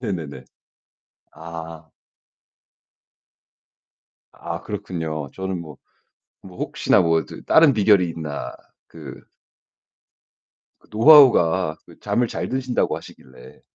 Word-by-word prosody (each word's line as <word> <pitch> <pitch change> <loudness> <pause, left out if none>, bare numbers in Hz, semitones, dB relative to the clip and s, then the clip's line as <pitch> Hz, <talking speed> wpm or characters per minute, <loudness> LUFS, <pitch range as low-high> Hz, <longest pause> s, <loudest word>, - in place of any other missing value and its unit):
네네네. 80 - -6 0.9
아 80 -1 -10 2.4
아 - - -7
그렇군요. 80 -5 -6
저는 95 -1 -5
뭐 75 -4 -12 0.7
뭐 90 -1 -14
혹시나 - - +1
뭐 80 -2 +1
더 - - -12
다른 160 -3 +5
비결이 100 -5 +3
있나 80 -3 -6 0.3
그 75 -6 -12 1.6
그 - - -26
노하우가 105 - +5 0.2
잠을 120 -1 0
잘 - - -5
드신다고 130 -1 -1
하시길래. 65 -2 -16
85 Hz, 185 characters per minute, -21 LUFS, 80-105 Hz, 2.4 s, 다른